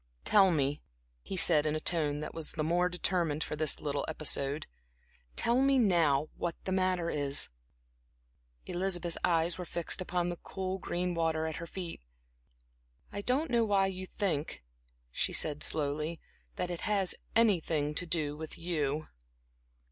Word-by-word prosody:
"Tell 195 -2 +6
me," 145 -3 0 0.4
he 190 - -6
said, 155 -4 +5
in 150 - 0
a - - -1
tone 150 -3 0
that - - -5
was 165 -2 -3
the 155 - -2
more 175 +3 +2
determined 175 -4 0
for - - -4
this 155 -1 +2
little 145 -1 -2
episode 150 -2 +1 0.7
"tell 240 +2 +2
me 275 0 +4
now 165 - +3
what 170 -1 -3
the 190 - -3
matter 185 -2 +1
is." 145 -1 +2 1.2
Elizabeth's 175 -2 -1
eyes 170 +1 +2
were - - -3
fixed 170 +1 0
upon 180 -1 -1
the 175 - -4
cool, 190 +1 -4
green 180 0 -2
water 160 -1 0
at 160 0 -3
her 170 - -6
feet. 175 - -6 1.1
"I 200 - -4
don't 260 +6 0
know 235 -1 +3
why 200 -3 +3
you 185 -1 -4
think," 160 - -2 0.5
she - - -1
said, 150 -1 +1
slowly 150 +2 +1 0.4
"that 180 - -3
it 175 - -4
has 200 -3 +1 0.2
anything 165 -9 +2
to 175 +3 -1
do 155 -3 0
with 160 +1 -7
you." 155 -3 -2
170 Hz, 155 wpm, -31 LUFS, 155-185 Hz, 1.2 s, Tell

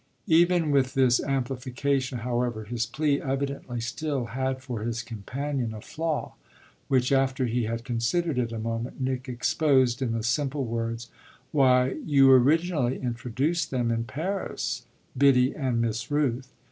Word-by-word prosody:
Even 170 -1 +4
with 135 -2 +2
this 130 -2 +4
amplification, 130 0 -1
however, 120 -2 -1
his 115 +2 -2
plea 145 +3 0
evidently 135 -2 -3
still 130 +3 -2
had 130 0 -1
for 125 -4 -4
his 115 +1 -3
companion 120 +2 -4
a 105 - -8
flaw; 160 +3 -3 0.5
which, 130 -1 +2
after 135 -1 +2
he 120 0 0
had 115 +1 -3
considered 130 +5 0
it 120 -2 -1
a 115 - -4
moment, 115 +3 -4
Nick 130 0 -2
exposed 130 0 +2
in 125 -3 0
the 115 -1 -2
simple 135 +3 0
words: 115 0 -3 0.4
"Why, 130 -3 +3
you 135 -3 +5
originally 140 0 +3
introduced 130 +7 -1
them 120 -3 0
in 115 0 -1
Paris, 170 +10 -3 0.3
Biddy 130 -1 +4
and 130 -5 -1
Miss 115 0 -1
Rooth. 135 -3 0
130 Hz, 145 wpm, -27 LUFS, 120-140 Hz, 0.5 s, you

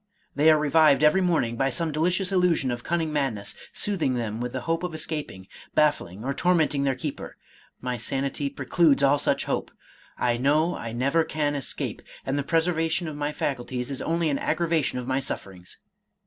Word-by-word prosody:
They 150 +3 +4
are 155 - +6
revived 150 -1 +4
every 150 +5 +5
morning 155 -10 +1
by 135 +2 +2
some 165 +1 -1
delicious 180 +5 0
illusion 180 -8 +2
of 120 0 -4
cunning 165 -2 -1
madness, 125 -9 -1 0.2
soothing 170 -11 0
them 115 -1 -3
with 125 0 -3
the 130 - -4
hope 165 +4 -1
of 180 -3 -4
escaping, 150 -12 -5 0.3
baffling 115 - +1
or 140 - 0
tor 180 +5 +2
menting 150 -4 +1
their 135 -1 +1
keeper; 140 +2 -6 0.4
my 125 -1 -2
sanity 135 +4 -2
precludes 140 +1 +2
all 140 +1 +4
such - - 0
hope. - - -2 0.4
/ - - -27
know 140 +8 +2
I 115 - -5
never 140 +8 +2
can 150 -2 -1
escape, 140 -2 -4 0.2
and 135 - -1
the 145 - +1
preservation 165 +2 0
of 155 - -5
my 145 0 -2
facul 135 -4 -3
ties 125 +1 -3
is 135 - -4
only 165 -1 0
an 140 - -1
aggravation 160 -4 0
of 125 - -4
my 130 +1 0
sufferings. 95 -9 -6
145 Hz, 190 wpm, -26 LUFS, 130-160 Hz, 0.4 s, are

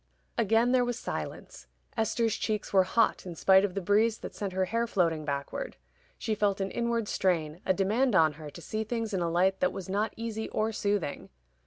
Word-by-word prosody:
Again 230 +2 +3
there 255 -1 +4
was 245 -1 -2
silence. - - -6 0.3
Esther's 225 0 +1
cheeks 215 -2 -2
were 190 -1 +5
hot 225 +4 +2
in 180 -2 -7
spite 190 +3 +5
of 200 -2 -1
the 195 - -1
breeze 215 +4 +3
that - - -8
sent 200 -2 -4
her 190 0 0
hair 230 +5 0
floating 165 -7 +1
backward. 140 - -4 0.4
She 220 - -2
felt 205 -2 +1
an 195 -1 -2
inward 235 -2 -1
strain, 170 -4 0
a 190 - +4
demand 215 +6 +2
on 160 -4 +5
her 150 - -7
to 170 - -11
see 220 0 -2
things 225 -1 -3
in 185 - 0
a 170 - 0
light 185 +3 +2
that 180 - +2
was 190 -2 -7
not 205 +3 -1
easy 220 -1 -4
or 220 +1 0
soothing. 205 -7 -2
205 Hz, 205 wpm, -29 LUFS, 185-225 Hz, 0.4 s, were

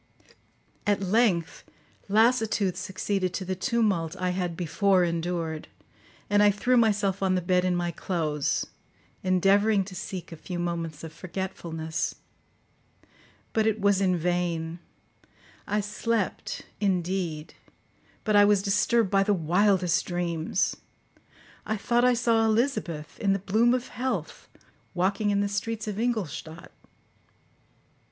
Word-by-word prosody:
At 205 -1 +3
length 190 -4 +1 0.5
lassitude 220 -3 +3
succeeded 190 -1 -2
to 190 - -3
the 185 +1 -2
tumult 195 -6 0
I 180 -1 0
had 180 -2 -2
before 185 +2 +2
endured, 170 -2 -2 0.6
and 205 0 +3
I 210 - +7
threw 210 +5 +1
myself 205 -4 +2
on 190 -1 +2
the - - +2
bed 180 +1 +1
in 180 -1 +1
my 175 0 -1
clothes, 155 -4 -1 0.6
endeavouring 195 +3 +3
to 190 0 -10
seek 185 -2 -6
a - - -6
few 175 +3 -6
moments 170 -3 -3
of 160 -1 -8
forgetfulness. 170 -3 -4 1.4
But 220 -1 +2
it 220 0 +1
was 200 -1 +3
in 185 -2 +2
vain; 170 -1 -1 0.9
I 210 0 +1
slept, 210 0 -2 0.2
indeed, 180 -5 -1 0.7
but 215 -2 +1
I 205 - +8
was 205 -1 +4
disturbed 210 +1 +2
by 195 -1 +4
the 205 +1 +2
wildest 180 +1 +2
dreams. 175 -1 -1 0.9
I 220 - -2
thought 240 +4 +1
I 250 0 +5
saw 230 -1 +2
Elizabeth, 220 - -1
in 195 -2 +2
the - - +1
bloom 220 +6 +2
of 250 -1 -4
health, 255 +1 -4 0.5
walking 195 +3 +1
in 200 0 +2
the 205 - +1
streets 215 +2 -3
of 210 0 -3
Ingolstadt. 175 - -3
190 Hz, 130 wpm, -27 LUFS, 175-210 Hz, 1.4 s, I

